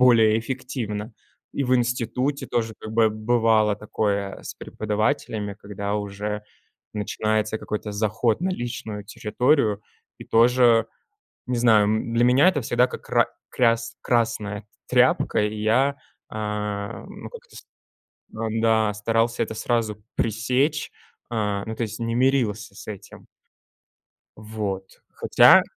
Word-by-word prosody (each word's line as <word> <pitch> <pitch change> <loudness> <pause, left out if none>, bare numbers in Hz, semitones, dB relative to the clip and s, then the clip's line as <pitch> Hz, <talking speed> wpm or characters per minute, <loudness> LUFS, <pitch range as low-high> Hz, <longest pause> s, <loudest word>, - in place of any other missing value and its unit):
более 115 -3 +6
эффективно. 115 -3 -4 0.4
И 140 - -1
в 130 +1 +3
институте 125 +3 -1
тоже 115 -2 -1
как 110 - -7
бы 110 -1 +4
бывало 110 -1 +2
такое 100 -2 -2
с - - -7
преподавателями, 105 -1 -2
когда 100 0 -4
уже 105 +1 -4 0.5
начинается 110 +1 -1
какой-то 105 -1 -4
заход 110 - 0
на 185 - 0
личную 115 - -5
территорию. 110 0 +1 0.4
И - - -9
тоже, 120 -1 +4 0.6
не 125 -1 0
знаю, 110 -3 +5
м, 110 +2 -1
для 115 +1 +3
меня 130 +7 +5
это 145 -7 -1
всегда 120 +2 +2
как - - -9
ра - - +4 0.2
кряс 115 -2 +1
красная 110 -3 -1 0.2
тряпка, - - +3
и 105 +1 -1
я, 130 +6 +3 0.3
ам, 105 - -4 0.2
ну, - - -6
как-то 475 0 -13
с - - -10 0.7
ам, 110 0 -2
да, 110 -2 +3
старался 115 +3 +1
это - - -7
сразу 110 -2 -1
пресечь, 125 +7 0 0.4
а, 105 -3 -1
ну, 110 - -4
то - - -3
есть 110 -1 -4
не 115 0 -1
мирился 120 -5 +1
с - - -11
этим. 105 -3 -9 1.1
Вот, 105 -3 -5
хотя - - +7
110 Hz, 130 wpm, -24 LUFS, 105-120 Hz, 1.1 s, хотя